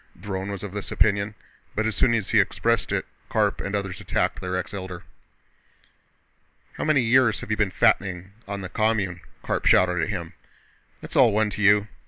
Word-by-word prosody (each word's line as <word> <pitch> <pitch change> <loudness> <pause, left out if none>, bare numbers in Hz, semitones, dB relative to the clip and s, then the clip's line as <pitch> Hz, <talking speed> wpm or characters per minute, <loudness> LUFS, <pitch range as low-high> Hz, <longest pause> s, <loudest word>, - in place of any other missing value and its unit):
Dron 95 0 -4
was 100 -1 -5
of 100 - -5
this 105 0 -6
opinion, 105 0 +1 0.4
but 110 - 0
as 110 -2 -1
soon 115 -2 +3
as 105 -4 -2
he - - +5
expressed - - +1
it - - -1 0.2
Karp - - +1
and 100 +1 -3
others 100 -2 -4
attacked - - -1
their 90 0 -3
ex 95 - -5
Elder. 95 -3 -6 1.7
"How - - -5
many 155 -3 +3
years 120 -1 +3
have - - -6
you 110 - +1
been 105 -2 +2
fattening 95 0 +1 0.2
on 100 0 -4
the 95 - -6
commune?" 100 -3 0 0.2
Karp - - -1
shouted 90 -1 +4
at 80 - -1
him. 85 -6 -5 0.7
"It's - - -7
all 125 -4 +6
one 105 0 +1
to 105 - -5
you! 105 0 +5
100 Hz, 190 wpm, -24 LUFS, 95-110 Hz, 1.7 s, all